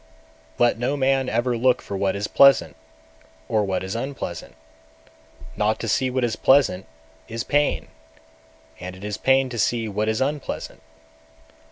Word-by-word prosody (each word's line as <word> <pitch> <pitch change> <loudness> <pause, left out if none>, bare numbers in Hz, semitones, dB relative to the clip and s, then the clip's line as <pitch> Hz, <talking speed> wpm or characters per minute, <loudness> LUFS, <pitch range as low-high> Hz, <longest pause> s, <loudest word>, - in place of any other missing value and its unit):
210. 120 - +4
Let 120 -1 +1
no 130 +4 -1
man 135 -1 +1
ever 120 +2 0
look 125 +2 +2
for 100 - -7
what 95 0 0
is 100 +1 -2
pleasant, 135 - +5 0.7
or 110 -1 +1
what 95 -2 -2
is 95 +3 -5
unpleasant. 115 - -5 1.0
Not 105 +1 0
to 115 - -4
see 130 +4 +1
what 130 0 -1
is 115 -2 0
pleasant 130 - +3 0.4
is 115 +1 -4
pain, 145 +1 0 0.9
and 90 +1 -7
it 95 - -13
is 105 0 -4
pain 135 +2 +3
to 120 -2 -5
see 115 +1 0
what 105 +1 -1
is 110 - -1
unpleasant. 145 +2 -3
115 Hz, 160 wpm, -23 LUFS, 105-130 Hz, 1.0 s, pleasant